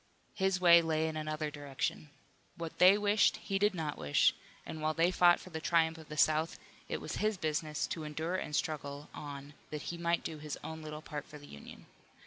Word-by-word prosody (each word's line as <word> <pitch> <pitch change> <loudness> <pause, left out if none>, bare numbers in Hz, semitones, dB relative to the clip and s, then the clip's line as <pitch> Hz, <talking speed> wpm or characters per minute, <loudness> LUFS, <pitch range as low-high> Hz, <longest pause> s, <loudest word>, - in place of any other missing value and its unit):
His 190 -2 +1
way 170 -1 +8
lay 160 -1 0
in 160 - -4
another 155 0 -3
direction. 145 0 -4 0.5
What 165 -1 -6
they 185 +3 +8
wished 205 0 +3
he 195 0 -2
did 205 -1 +2
not 155 -3 -3
wish, 70 0 +3 0.3
and 160 - -6
while 155 0 0
they 170 +2 +3
fought 175 -1 +5
for 185 - -12
the 160 -1 -5
triumph 160 -1 +2
of 160 - -13
the 150 - -7
South 155 +2 +2 0.3
it - - -2
was - - -5
his 215 -1 0
business 155 -2 -1
to 160 - -5
endure 155 +3 -3
and 150 -5 -3
struggle 145 -2 -3
on 145 -1 -8 0.2
that 150 0 -5
he 170 - -7
might 170 0 +1
do 155 -2 -5
his 150 -1 -5
own 160 0 -6
little 155 0 -7
part 150 -1 -6
for 150 - -10
the 145 - -13
Union. 70 - -12
155 Hz, 210 wpm, -33 LUFS, 150-170 Hz, 0.5 s, way